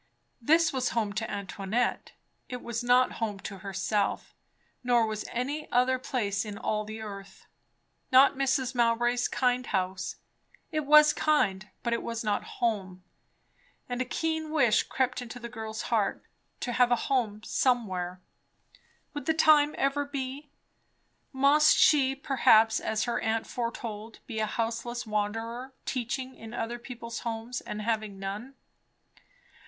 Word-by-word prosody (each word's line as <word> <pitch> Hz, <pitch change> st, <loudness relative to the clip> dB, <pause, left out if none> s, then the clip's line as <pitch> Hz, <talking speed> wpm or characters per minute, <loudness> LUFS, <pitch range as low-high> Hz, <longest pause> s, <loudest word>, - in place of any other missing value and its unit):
This 320 Hz, +6 st, +4 dB
was 255 Hz, -1 st, 0 dB
home 210 Hz, -3 st, 0 dB
to 220 Hz, +1 st, -3 dB
Antoinette. 200 Hz, +3 st, -2 dB, 0.4 s
It 250 Hz, -1 st, -6 dB
was 235 Hz, 0 st, -3 dB
not 250 Hz, +1 st, +4 dB
home 210 Hz, -3 st, -1 dB
to 195 Hz, -, -7 dB
herself, 195 Hz, +1 st, -2 dB, 0.5 s
nor 240 Hz, -2 st, +3 dB
was 215 Hz, -1 st, -4 dB
any 280 Hz, +6 st, -3 dB
other 255 Hz, +1 st, +3 dB
place 205 Hz, -6 st, -1 dB
in 210 Hz, -2 st, -7 dB
all 215 Hz, +1 st, -1 dB
the 215 Hz, +1 st, -7 dB
earth. 195 Hz, -2 st, -9 dB, 0.7 s
Not 260 Hz, +2 st, +7 dB
Mrs. 265 Hz, -1 st, 0 dB
Mowbray's 240 Hz, 0 st, +2 dB
kind 250 Hz, -1 st, 0 dB
house; 185 Hz, -1 st, -2 dB, 0.6 s
it 310 Hz, -3 st, -2 dB
was 300 Hz, 0 st, +8 dB
kind, 210 Hz, -10 st, +1 dB
but 235 Hz, -, 0 dB
it 235 Hz, -, -1 dB
was 230 Hz, 0 st, -4 dB
not 210 Hz, -2 st, 0 dB
home; 190 Hz, -6 st, -2 dB, 0.8 s
and 245 Hz, 0 st, -2 dB
a -, -, 0 dB
keen 320 Hz, +4 st, -2 dB
wish 260 Hz, -9 st, +4 dB
crept 255 Hz, -1 st, -1 dB
into 245 Hz, 0 st, -8 dB
the 235 Hz, -, -6 dB
girl's 220 Hz, -1 st, -5 dB
heart. 220 Hz, -4 st, 0 dB, 0.4 s
To 245 Hz, -, -2 dB
have 245 Hz, 0 st, +3 dB
a -, -, +6 dB
home 220 Hz, -6 st, 0 dB
somewhere! 185 Hz, -8 st, 0 dB, 0.9 s
Would 290 Hz, -3 st, -6 dB
the 320 Hz, -, +2 dB
time 300 Hz, -2 st, +5 dB
ever 275 Hz, +1 st, +1 dB
be? 280 Hz, 0 st, -5 dB, 0.8 s
Must 285 Hz, +3 st, +5 dB
she 270 Hz, -3 st, +5 dB
perhaps, 225 Hz, -5 st, +4 dB
as 220 Hz, 0 st, -1 dB
her 240 Hz, -1 st, -1 dB
aunt 225 Hz, 0 st, -1 dB
foretold, 230 Hz, -2 st, -5 dB
be 220 Hz, -, -5 dB
a 215 Hz, -, +1 dB
houseless 230 Hz, +2 st, -3 dB
wanderer, 225 Hz, +5 st, -3 dB
teaching 255 Hz, +1 st, -3 dB
in 225 Hz, 0 st, -10 dB
other 240 Hz, +1 st, -3 dB
people's 235 Hz, -1 st, -7 dB
homes, 230 Hz, +1 st, -4 dB
and 210 Hz, 0 st, -6 dB
having 215 Hz, -3 st, -2 dB
none? 205 Hz, +7 st, -6 dB
235 Hz, 145 wpm, -28 LUFS, 215-260 Hz, 0.9 s, was